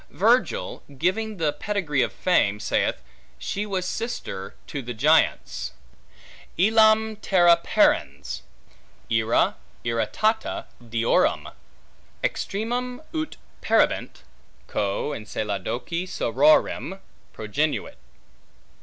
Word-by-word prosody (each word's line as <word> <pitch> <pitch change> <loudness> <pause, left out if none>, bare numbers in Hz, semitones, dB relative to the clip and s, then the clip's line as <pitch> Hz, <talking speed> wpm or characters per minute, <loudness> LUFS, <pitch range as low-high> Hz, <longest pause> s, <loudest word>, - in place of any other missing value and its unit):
Virgil, - - +1 0.2
giving 210 +7 0
the 155 -4 +1
pedigree 195 -10 -1
of - - +1
Fame, 105 - +2
saith, 85 - 0 0.3
she 205 - -3
was 190 -3 -2
sister 185 - -4
to 140 - -5
the 120 -1 -6
Giants: - - +2 0.8
Illam 220 +2 +4
Terra 175 -3 +5
parens, - - +1 0.7
irra 115 0 +2 0.3
irritata 215 - 0 0.2
deorum, 115 0 +1 0.7
Extremam 245 +5 -2
(ut 315 -1 -3 0.2
perhibent) - - +1 0.4
Coeo 100 +8 -1
Enceladoque 110 - -3
sororem 155 - +2 0.3
Progenuit. 125 - -2
170 Hz, 85 wpm, -25 LUFS, -, 0.8 s, Terra